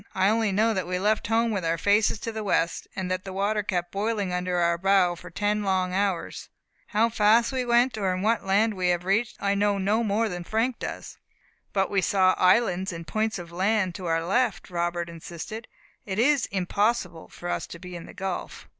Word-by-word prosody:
"I 190 Hz, -, +3 dB
only 220 Hz, -1 st, +2 dB
know 220 Hz, +3 st, +2 dB
that 185 Hz, -4 st, -2 dB
we 180 Hz, 0 st, -1 dB
left 210 Hz, +3 st, +1 dB
home 230 Hz, +1 st, +2 dB
with 195 Hz, -4 st, -2 dB
our 165 Hz, 0 st, 0 dB
faces 205 Hz, +5 st, +2 dB
to 230 Hz, -, -3 dB
the 220 Hz, -1 st, -5 dB
west, 170 Hz, -4 st, 0 dB
and 185 Hz, -1 st, -3 dB
that 185 Hz, 0 st, -2 dB
the 190 Hz, -, -7 dB
water 200 Hz, +3 st, 0 dB
kept 175 Hz, -3 st, -2 dB
boiling 200 Hz, -2 st, -1 dB
under 180 Hz, 0 st, -1 dB
our 170 Hz, -1 st, +2 dB
bow 190 Hz, -1 st, +3 dB
for 180 Hz, +1 st, -11 dB
ten 205 Hz, +4 st, 0 dB
long 185 Hz, -2 st, 0 dB
hours. 195 Hz, -3 st, -2 dB, 0.4 s
How 220 Hz, +2 st, +2 dB
fast 225 Hz, +2 st, +3 dB
we 260 Hz, -1 st, -1 dB
went, 240 Hz, -1 st, +2 dB
or 185 Hz, -2 st, 0 dB
what 215 Hz, +4 st, +1 dB
land 205 Hz, +3 st, +2 dB
we 185 Hz, -2 st, -1 dB
have 175 Hz, 0 st, 0 dB
reached, 215 Hz, +5 st, 0 dB
I 200 Hz, 0 st, +1 dB
know 200 Hz, 0 st, +1 dB
no 205 Hz, +4 st, +1 dB
more 220 Hz, +1 st, +1 dB
than 175 Hz, -4 st, -5 dB
Frank 225 Hz, +6 st, -1 dB
does." -, -, -7 dB, 0.5 s
"But 195 Hz, -1 st, 0 dB
we 200 Hz, -2 st, +2 dB
saw 185 Hz, -1 st, +3 dB
islands 185 Hz, 0 st, +3 dB
and 165 Hz, -1 st, -7 dB
points 215 Hz, +7 st, -1 dB
of 170 Hz, -2 st, -9 dB
land 190 Hz, +1 st, +1 dB
to 185 Hz, -1 st, -6 dB
our 165 Hz, 0 st, 0 dB
left," 220 Hz, 0 st, 0 dB
Robert 175 Hz, 0 st, -1 dB
insisted; 170 Hz, +6 st, -8 dB, 0.4 s
"it 190 Hz, -1 st, -5 dB
is 270 Hz, +2 st, +3 dB
impossible 195 Hz, -2 st, -1 dB
for 175 Hz, -, -9 dB
us -, -, -2 dB
to -, -, -9 dB
be 180 Hz, +1 st, -9 dB
in 170 Hz, -, -8 dB
the -, -, -12 dB
gulf." 190 Hz, -1 st, -5 dB
195 Hz, 210 wpm, -26 LUFS, 180-220 Hz, 0.5 s, I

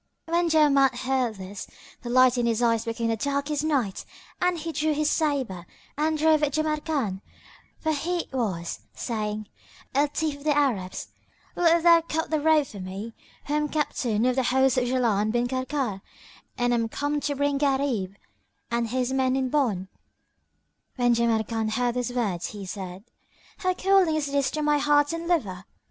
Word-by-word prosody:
When 340 Hz, +1 st, +1 dB
Jawamard 280 Hz, -4 st, +4 dB
heard 255 Hz, -3 st, 0 dB
this, 195 Hz, +1 st, -8 dB, 0.3 s
the 240 Hz, -, -6 dB
light 255 Hz, 0 st, +5 dB
in 240 Hz, -1 st, +1 dB
his 230 Hz, -1 st, +1 dB
eyes 230 Hz, -1 st, +2 dB
became 230 Hz, 0 st, -1 dB
darkest 285 Hz, +3 st, -1 dB
night 270 Hz, -11 st, 0 dB, 0.4 s
and 360 Hz, -1 st, +2 dB
he 330 Hz, +1 st, -4 dB
drew 310 Hz, -1 st, 0 dB
his 300 Hz, 0 st, +1 dB
sabre 265 Hz, -, -1 dB, 0.3 s
and 310 Hz, +1 st, 0 dB
drove 310 Hz, 0 st, +4 dB
at 290 Hz, -2 st, +1 dB
Jamrkan, 305 Hz, -10 st, -1 dB, 0.6 s
for 315 Hz, -, -1 dB
he 340 Hz, +4 st, -1 dB
it -, -, -15 dB
was, 190 Hz, -10 st, -2 dB, 0.2 s
saying, 215 Hz, -2 st, -3 dB, 0.5 s
"O 285 Hz, +2 st, +3 dB
thief 300 Hz, 0 st, -2 dB
of 285 Hz, -, -14 dB
the 295 Hz, -1 st, +2 dB
Arabs, 215 Hz, -11 st, -1 dB, 0.5 s
wilt 335 Hz, -1 st, +3 dB
thou 335 Hz, -1 st, +7 dB
cut 320 Hz, 0 st, -3 dB
the 310 Hz, -, +2 dB
road 310 Hz, -1 st, +4 dB
for 210 Hz, -6 st, -10 dB
me, 195 Hz, +5 st, -6 dB, 0.3 s
who 290 Hz, -, -3 dB
am 300 Hz, 0 st, +1 dB
captain 245 Hz, -7 st, 0 dB
of 255 Hz, 0 st, +2 dB
the 260 Hz, -, +2 dB
host 265 Hz, 0 st, +3 dB
of 250 Hz, -, 0 dB
Jaland 230 Hz, -4 st, +1 dB
bin 240 Hz, 0 st, +1 dB
Karkar 255 Hz, -5 st, -2 dB, 0.6 s
and 245 Hz, 0 st, +1 dB
am 230 Hz, -1 st, 0 dB
come 290 Hz, +4 st, -1 dB
to 285 Hz, 0 st, -2 dB
bring 285 Hz, 0 st, 0 dB
Gharib 265 Hz, -9 st, 0 dB, 0.6 s
and 235 Hz, 0 st, 0 dB
his 255 Hz, +2 st, -1 dB
men 260 Hz, -1 st, +2 dB
in 265 Hz, -1 st, 0 dB
bond?" 230 Hz, -10 st, 0 dB, 1.1 s
When 245 Hz, -2 st, +3 dB
Jamrkan 225 Hz, -1 st, 0 dB
heard 245 Hz, +1 st, +1 dB
these 250 Hz, 0 st, -2 dB
words, 210 Hz, -9 st, -1 dB
he 205 Hz, -2 st, -8 dB
said, 185 Hz, 0 st, -7 dB, 0.6 s
"How 370 Hz, -1 st, 0 dB
cooling 380 Hz, -4 st, +3 dB
is 290 Hz, -2 st, -1 dB
this 280 Hz, -2 st, +1 dB
to 305 Hz, +3 st, -3 dB
my 295 Hz, 0 st, +3 dB
heart 290 Hz, +1 st, +3 dB
and 330 Hz, 0 st, -4 dB
liver!" 200 Hz, -, -1 dB
265 Hz, 175 wpm, -26 LUFS, 230-300 Hz, 1.1 s, thou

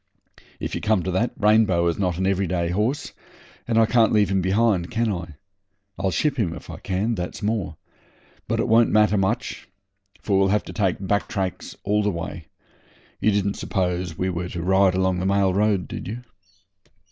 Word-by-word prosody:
'If -, -, -4 dB
you -, -, -3 dB
come 105 Hz, -4 st, +1 dB
to 95 Hz, -, -2 dB
that, 105 Hz, +7 st, +1 dB
Rainbow 105 Hz, -5 st, +3 dB
is 85 Hz, +1 st, 0 dB
not 90 Hz, -4 st, 0 dB
an 95 Hz, -, -1 dB
every 95 Hz, 0 st, +1 dB
day 85 Hz, -1 st, -1 dB
horse, 105 Hz, +10 st, -1 dB, 0.5 s
and 115 Hz, -1 st, +1 dB
I 115 Hz, -, +6 dB
can't 115 Hz, 0 st, +3 dB
leave 105 Hz, -3 st, +3 dB
him 95 Hz, -1 st, +2 dB
behind, 95 Hz, -1 st, +1 dB
can 115 Hz, -1 st, 0 dB
I? 85 Hz, -5 st, -5 dB, 0.6 s
I'll 95 Hz, -, +1 dB
ship 135 Hz, -, 0 dB
him, 85 Hz, -7 st, 0 dB
if -, -, -10 dB
I -, -, -7 dB
can, 100 Hz, +5 st, -1 dB
that's 90 Hz, +1 st, -5 dB
more. 105 Hz, -7 st, -2 dB, 0.7 s
But -, -, -1 dB
it -, -, +1 dB
won't 115 Hz, +1 st, +5 dB
matter 105 Hz, -1 st, +4 dB
much, 95 Hz, -1 st, -1 dB, 0.5 s
for 100 Hz, -2 st, +1 dB
we'll 95 Hz, -, +4 dB
have 105 Hz, +2 st, +1 dB
to -, -, -8 dB
take 95 Hz, -2 st, -1 dB
back 100 Hz, -2 st, 0 dB
tracks 95 Hz, -4 st, -4 dB
all 105 Hz, +1 st, +1 dB
the 105 Hz, -, +1 dB
way. 85 Hz, -2 st, -5 dB, 0.7 s
You -, -, +2 dB
didn't 100 Hz, -1 st, 0 dB
suppose 90 Hz, -3 st, -2 dB
we 95 Hz, 0 st, -1 dB
were 90 Hz, 0 st, -4 dB
to 85 Hz, -2 st, -5 dB
ride 95 Hz, 0 st, +3 dB
along 95 Hz, -1 st, +1 dB
the 95 Hz, -, -1 dB
mail 100 Hz, -1 st, +2 dB
road, 100 Hz, -2 st, +1 dB
did -, -, -7 dB
you?' 115 Hz, +5 st, -6 dB
95 Hz, 195 wpm, -23 LUFS, 90-105 Hz, 0.7 s, I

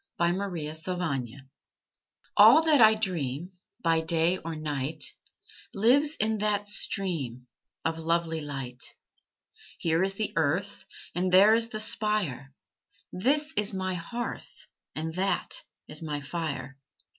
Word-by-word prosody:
SUNSET 175 Hz, +3 st, +1 dB
ON 200 Hz, -2 st, -4 dB
THE 155 Hz, -2 st, -4 dB
SPIRE 145 Hz, -7 st, -3 dB, 0.9 s
All 320 Hz, -, +8 dB
that 305 Hz, -5 st, +4 dB
I 220 Hz, 0 st, +8 dB
dream 175 Hz, -6 st, -3 dB, 0.3 s
By 165 Hz, -1 st, +3 dB
day 165 Hz, +2 st, +2 dB
or 165 Hz, 0 st, -6 dB
night 150 Hz, 0 st, -3 dB, 0.7 s
Lives 280 Hz, +9 st, +4 dB
in 220 Hz, -3 st, 0 dB
that 205 Hz, -1 st, 0 dB
stream 160 Hz, -, -3 dB, 0.4 s
Of 165 Hz, -, -1 dB
lovely 165 Hz, 0 st, 0 dB
light. 135 Hz, -4 st, -6 dB, 1.0 s
Here 165 Hz, 0 st, +1 dB
is 195 Hz, +1 st, +2 dB
the 215 Hz, 0 st, -2 dB
earth, 165 Hz, +6 st, 0 dB, 0.3 s
And 180 Hz, +1 st, 0 dB
there 200 Hz, +4 st, +7 dB
is 230 Hz, 0 st, +2 dB
the 215 Hz, -, -5 dB
spire; 210 Hz, -, -1 dB, 0.6 s
This 295 Hz, +10 st, +1 dB
is 205 Hz, -5 st, +1 dB
my 185 Hz, 0 st, -2 dB
hearth, 235 Hz, +8 st, -6 dB, 0.3 s
And 160 Hz, +1 st, -3 dB
that 195 Hz, -, -1 dB, 0.3 s
is -, -, -8 dB
my 150 Hz, -2 st, -3 dB
fire. 140 Hz, -4 st, -5 dB
175 Hz, 130 wpm, -28 LUFS, 155-210 Hz, 1.0 s, All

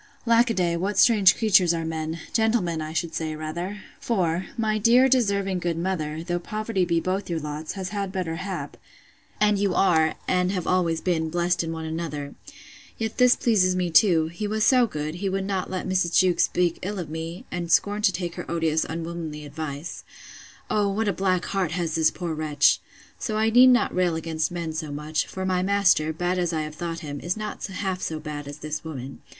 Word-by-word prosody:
Lack 235 Hz, +1 st, +4 dB
a 230 Hz, -, 0 dB
day, 175 Hz, -2 st, +1 dB
what 195 Hz, +4 st, -2 dB
strange 205 Hz, -6 st, +6 dB
creatures 185 Hz, -6 st, +4 dB
are 165 Hz, -1 st, -3 dB
men! 160 Hz, 0 st, -4 dB
gentlemen, 220 Hz, -8 st, +1 dB
I 155 Hz, 0 st, -5 dB
should 165 Hz, 0 st, -2 dB
say, 155 Hz, -1 st, -3 dB
rather! 170 Hz, +6 st, -5 dB, 0.2 s
For, 180 Hz, -5 st, 0 dB
my 215 Hz, -1 st, 0 dB
dear 240 Hz, +5 st, +5 dB
deserving 200 Hz, -7 st, +1 dB
good 170 Hz, -2 st, -2 dB
mother, 165 Hz, -3 st, -2 dB
though 175 Hz, 0 st, -2 dB
poverty 215 Hz, 0 st, -2 dB
be 170 Hz, -1 st, +1 dB
both 185 Hz, +3 st, -2 dB
your 170 Hz, -2 st, -1 dB
lots, 150 Hz, +1 st, -5 dB
has 190 Hz, -2 st, -5 dB
had 200 Hz, -2 st, -3 dB
better 180 Hz, -4 st, -3 dB
hap, 190 Hz, +2 st, -5 dB, 0.6 s
and 210 Hz, -1 st, +3 dB
you 195 Hz, -2 st, +1 dB
are, 160 Hz, -4 st, +3 dB
and 180 Hz, 0 st, +2 dB
have 180 Hz, -3 st, -2 dB
always 170 Hz, -3 st, +1 dB
been, 160 Hz, -3 st, 0 dB
blest 175 Hz, +1 st, 0 dB
in 165 Hz, -, -4 dB
one 160 Hz, -1 st, -5 dB
another!—Yet 160 Hz, -, -7 dB
this 250 Hz, -1 st, +6 dB
pleases 185 Hz, -6 st, +2 dB
me 180 Hz, -2 st, -1 dB
too; 160 Hz, -4 st, +5 dB
he 190 Hz, +6 st, -4 dB
was 215 Hz, +1 st, 0 dB
so 250 Hz, 0 st, +5 dB
good, 150 Hz, -4 st, -4 dB
he 195 Hz, -, 0 dB
would 190 Hz, 0 st, -2 dB
not 195 Hz, -2 st, -2 dB
let 185 Hz, -1 st, -3 dB
Mrs. 185 Hz, -2 st, +1 dB
Jewkes 180 Hz, -2 st, +4 dB
speak 175 Hz, -2 st, 0 dB
ill 205 Hz, +3 st, -4 dB
of 175 Hz, -4 st, -4 dB
me, 165 Hz, +7 st, -6 dB
and 170 Hz, -1 st, -3 dB
scorned 205 Hz, +4 st, +3 dB
to -, -, +5 dB
take 175 Hz, -2 st, -4 dB
her -, -, -6 dB
odious 160 Hz, -2 st, +1 dB
unwomanly 165 Hz, -2 st, -5 dB
advice. 145 Hz, +1 st, -6 dB, 0.7 s
O, 205 Hz, -1 st, +2 dB
what 210 Hz, +2 st, 0 dB
a -, -, 0 dB
black 185 Hz, 0 st, 0 dB
heart 190 Hz, -5 st, -1 dB
has 170 Hz, -2 st, -2 dB
this 160 Hz, -1 st, +4 dB
poor 175 Hz, -3 st, -4 dB
wretch! 150 Hz, -2 st, +3 dB, 0.4 s
So 215 Hz, -2 st, -2 dB
I 220 Hz, +1 st, +2 dB
need 250 Hz, +3 st, +8 dB
not 250 Hz, -1 st, +4 dB
rail 180 Hz, -2 st, +1 dB
against 160 Hz, -1 st, -2 dB
men 170 Hz, -2 st, -4 dB
so 155 Hz, -2 st, -4 dB
much; 150 Hz, +1 st, -2 dB
for 190 Hz, 0 st, -5 dB
my 185 Hz, -1 st, +1 dB
master, 190 Hz, -5 st, +3 dB
bad 175 Hz, +3 st, -1 dB
as 175 Hz, -1 st, 0 dB
I 155 Hz, -1 st, -1 dB
have 155 Hz, 0 st, -6 dB
thought 165 Hz, +1 st, -5 dB
him, 145 Hz, -3 st, -6 dB
is 175 Hz, +6 st, -2 dB
not 215 Hz, -1 st, -5 dB
half 190 Hz, -1 st, -3 dB
so 160 Hz, -1 st, -3 dB
bad 150 Hz, -2 st, -6 dB
as 145 Hz, 0 st, -7 dB
this 150 Hz, 0 st, -5 dB
woman. 135 Hz, -4 st, -7 dB
175 Hz, 205 wpm, -25 LUFS, 160-195 Hz, 0.7 s, need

